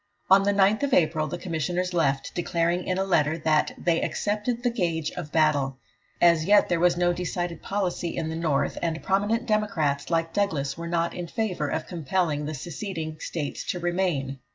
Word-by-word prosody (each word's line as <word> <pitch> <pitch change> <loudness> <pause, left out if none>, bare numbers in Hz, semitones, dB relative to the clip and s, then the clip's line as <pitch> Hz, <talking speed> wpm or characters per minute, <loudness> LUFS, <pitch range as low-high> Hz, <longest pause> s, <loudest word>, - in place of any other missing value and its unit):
On 195 +1 +8
the 200 +1 +2
9th 200 +3 +3
of 280 - +2
April 155 -2 +2
the 175 - -4
Commissioners 180 +1 -2
left, 140 -5 0
declaring 175 0 0
in 185 - 0
a 190 - +1
letter 160 -5 +2
that 155 -2 +1
"they 165 -1 +1
accepted 215 +4 -1
the 245 - +2
gage 165 -8 -1
of 160 -4 -7
battle." 145 -4 +2 0.4
As 170 -2 +4
yet 205 +2 +5
there 175 -2 +1
was 175 0 +3
no 175 0 +2
decided 175 -1 -3
policy 185 -4 -2
in 160 - -1
the 160 - -3
North, 160 -4 0
and 165 -1 -2
prominent 205 +5 +1
Democrats 185 -10 0
like 165 -1 0
Douglas 155 -9 0
were 170 0 -6
not 170 0 0
in 175 -1 -5
favour 180 -7 -2
of 160 +2 -2
compelling 165 -3 -1
the 155 - -4
seceding 160 +1 -5
States 150 -4 -4
to 180 - -2
remain. 175 -7 -1
170 Hz, 185 wpm, -26 LUFS, 155-190 Hz, 0.4 s, On